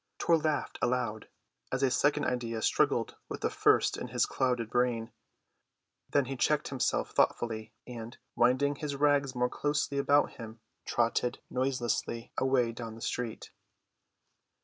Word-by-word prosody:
Tor 170 - +3
laughed 155 -1 -1
aloud 120 -3 -1 0.4
as 130 +1 -1
a 130 - +3
second 145 +3 +2
idea 115 -3 -2
struggled - - +1
with - - -5
the - - 0
first - - +3
in - - -5
his - - +1
clouded 125 -4 -1
brain; 120 -2 0 1.0
then 140 -2 +2
he 135 +1 -4
checked 150 +4 +1
himself 135 -2 0
thoughtfully, 110 -2 0
and, 120 -1 -8 0.2
winding 135 +4 +3
his 145 -1 -3
rags 140 -2 +2
more 125 0 +2
closely 145 +1 -1
about 145 +1 +3
him, 115 -1 -9 0.3
trotted 120 +1 +1
noiselessly 125 -3 -1
away 130 -3 +2
down 115 -1 -7
the 115 - -12
street. 120 -1 -4
125 Hz, 140 wpm, -30 LUFS, 115-140 Hz, 1.0 s, Tor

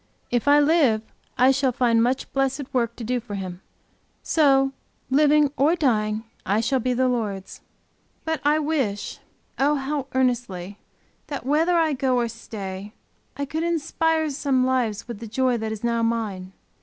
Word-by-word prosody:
If 245 +2 0
I 290 +1 +7
live, 290 -8 +3 0.3
I 255 +2 +6
shall 270 -1 +1
find 235 -2 +2
much 250 +3 -1
blessed 270 0 -1
work 235 -2 0
to 240 - -8
do 245 +2 -1
for 220 -3 -7
Him. 185 -2 -6 0.6
So 270 -3 +3 0.4
living 295 0 +4
or 295 +6 +4
dying 220 -8 0 0.2
I 205 +3 +1
shall 260 +4 +1
be 250 +1 0
the 255 +1 +2
Lord's. 210 -6 -3 0.6
But 320 -1 -1
I 295 +1 +3
wish, 285 -10 -2 0.4
oh 290 +2 +3
how 275 0 -3
earnestly, 230 -7 -1 0.5
that 285 -4 -5
whether 320 +6 +2
I 320 -2 +2
go 260 -1 +1
or 240 -1 +1
stay, 205 -3 -7 0.4
I 285 - -2
could 315 +3 -3
inspire 325 -1 0
some 270 -2 +1
lives 245 -5 0
with 235 -4 -7
the 230 - -7
joy 250 +2 +1
that 220 -1 -3
is 220 0 -6
now 235 -1 +1
mine. 210 -5 -2
255 Hz, 165 wpm, -24 LUFS, 225-285 Hz, 0.6 s, I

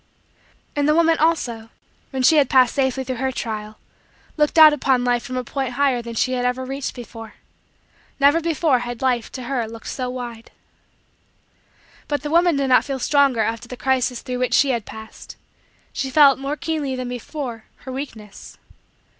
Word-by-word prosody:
And 290 0 +1
the 305 - +4
woman, 330 -1 +3
also, 245 -9 0 0.4
when 265 -2 -3
she 315 +5 +5
had 280 -4 +4
passed 255 -3 +4
safely 265 -1 0
through 255 -1 -4
her 265 +2 -1
trial, 215 -3 -5 0.6
looked 300 +1 +1
out 310 -1 +9
upon 265 -3 +1
Life 245 -1 +1
from 255 +1 -6
a 255 - -2
point 265 0 -4
higher 265 -2 +1
than 235 0 -8
she 255 - +1
had 250 -1 -1
ever 250 +1 -1
reached 270 +1 -5
before. 225 -2 -10 0.8
Never 285 +4 +4
before 315 -5 +1
had 240 0 -6
Life, 245 -3 0
to 255 - -6
her, 245 -2 -2
looked 225 0 -11
so 255 -1 -4
wide. 240 -2 -7 1.6
But 290 0 -2
the 295 - -4
woman 340 0 +4
did 280 0 0
not 255 - +5
feel 275 -2 -4
stronger 275 -3 +2
after 230 +2 -2
the 250 - -8
crisis 255 -2 0
through 250 -2 -4
which 250 - +1
she 275 -1 +4
had 235 -4 -2
passed; 220 0 -11 0.6
she 270 - -3
felt, 275 -1 +5
more 280 +2 -3
keenly 300 -5 -2
than 255 -1 -4
before, 245 -2 -6 0.2
her 260 - -6
weakness. 225 -7 -9
255 Hz, 180 wpm, -21 LUFS, 240-280 Hz, 1.6 s, out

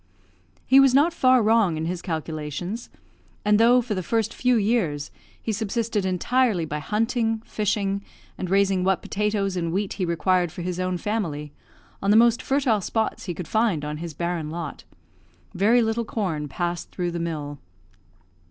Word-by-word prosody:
He 270 - +6
was 270 -2 +5
not 310 +5 +4
far 255 -6 +4
wrong 215 -6 +3
in 160 - -2
his 175 +1 -3
calculations; 160 - -4 0.6
and 210 0 +4
though, 240 +2 +6
for 225 -2 -3
the 185 - -2
first 225 +4 -1
few 250 0 +2
years, 200 -10 0 0.3
he 225 - -3
subsisted 220 -1 -1
entirely 200 0 +1
by 150 -1 -4
hunting, 225 - 0
fishing, 200 -1 -1 0.3
and 185 - -5
raising 195 -1 +2
what 190 0 +1
potatoes 205 -2 -1
and 170 -2 -1
wheat 195 +2 -1
he 185 - -2
required 175 +1 +1
for 175 +1 -7
his 180 0 -3
own 185 0 -1
family, 165 -8 -3 0.5
on 195 - 0
the 210 - +6
most 235 0 +5
fertile 265 -6 +1
spots 220 +3 -2
he 175 -3 -4
could 170 0 -6
find 215 -9 +1
on 150 0 -4
his 165 -1 -7
barren 170 -1 -2
lot, 165 -2 -6 0.7
very 225 +6 +4
little 225 +1 0
corn 180 -10 -3
passed 175 +4 -3
through 175 -2 -3
the 170 - -4
mill. 150 -4 -4
195 Hz, 170 wpm, -24 LUFS, 170-225 Hz, 0.7 s, He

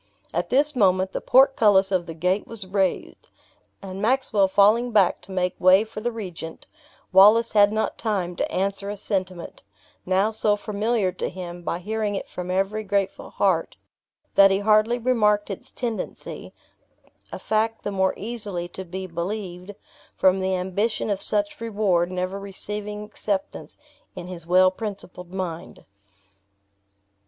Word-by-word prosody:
At - - -2
this 290 +3 +3
moment 190 -4 +2
the - - -4
portcullis 215 -8 +4
of 180 -2 0
the 165 - -7
gate 180 +5 0
was 225 -4 -7
raised, 190 -1 -2 0.5
and 190 0 -7
Maxwell 220 -4 +2
falling 210 +5 +4
back 205 -5 +3
to 195 - -14
make 180 -1 0
way 185 +3 +6
for 220 -1 -8
the 240 +2 -1
regent, 180 -7 -8 0.5
Wallace 215 +5 +6
had 205 -1 +5
not 220 0 -2
time 190 -6 -2
to - - -2
answer 200 +1 -2
a 205 - -5
sentiment, 185 -3 -4 0.4
now 190 +4 +1
so 215 -1 +2
familiar 210 -1 -1
to 180 - -4
him 175 -1 -8
by 170 - -3
hearing 210 +2 -2
it - - -4
from 180 0 -7
every 195 +4 -1
grateful 200 -1 -2
heart, 185 -5 0 0.6
that 195 0 +7
he 195 - +2
hardly 215 +3 +3
remarked 210 -4 +1
its 195 - -6
tendency, 235 -3 -5 0.8
a - - -5
fact 220 +1 -1
the 205 - -3
more 190 -1 +1
easily 205 -5 -4
to 190 - -7
be 190 +1 -6
believed, 180 +2 -5 0.4
from 190 0 +3
the 190 0 0
ambition 200 +5 -1
of 195 - -2
such 205 +1 -2
reward 200 -6 0
never 185 +2 -3
receiving 210 +1 -3
acceptance 205 -2 -4 0.4
in - - -7
his 175 -2 -9
well 185 +1 +5
principled 185 -3 -7
mind. 180 -3 -6
195 Hz, 150 wpm, -24 LUFS, 185-215 Hz, 0.8 s, that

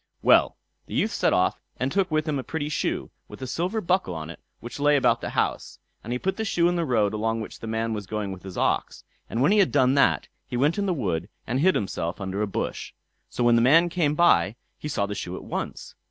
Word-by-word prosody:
Well! - - +5 0.3
the - - -6
youth - - +1
set - - +1
off, - - +1 0.2
and 130 +2 0
took 195 -1 +1
with 155 0 0
him 145 -3 0
a - - -4
pretty 150 0 -3
shoe, 150 - -2 0.2
with - - -11
a - - -2
silver 180 - -2
buckle 180 - 0
on 80 0 -6
it, - - -12 0.2
which 120 +4 -8
lay 145 +1 +4
about 140 - +3
the - - -3
house; - - -2 0.3
and 115 - -6
he 125 - 0
put 190 +9 -2
the 220 - -1
shoe 175 -5 +2
in 175 - +1
the 170 -1 0
road 110 -6 +1
along 115 +1 -1
which 110 - -7
the 115 - -7
man 110 0 -1
was 105 -3 -5
going 105 -1 -3
with 95 -1 -8
his 95 -2 -9
ox; - - 0 0.3
and 120 - 0
when 150 - +4
he 210 - +4
had 195 - +4
done 130 -2 +4
that, 140 - +3 0.2
he 125 - -3
went 150 +9 +2
into 200 - 0
the 185 - +2
wood 90 - -2 0.2
and 125 +3 -1
hid 185 +5 +4
himself 85 -3 -2
under 95 +1 -3
a 105 - 0
bush. 100 - -4 0.4
So 120 - -2
when 120 0 +5
the 115 - +4
man 165 +8 +5
came 160 -4 +1
by 105 - +4 0.2
he - - -5
saw 120 -9 0
the 100 - -4
shoe 90 -2 -5
at - - -8
once. - - -5
130 Hz, 255 wpm, -25 LUFS, 105-165 Hz, 0.4 s, Well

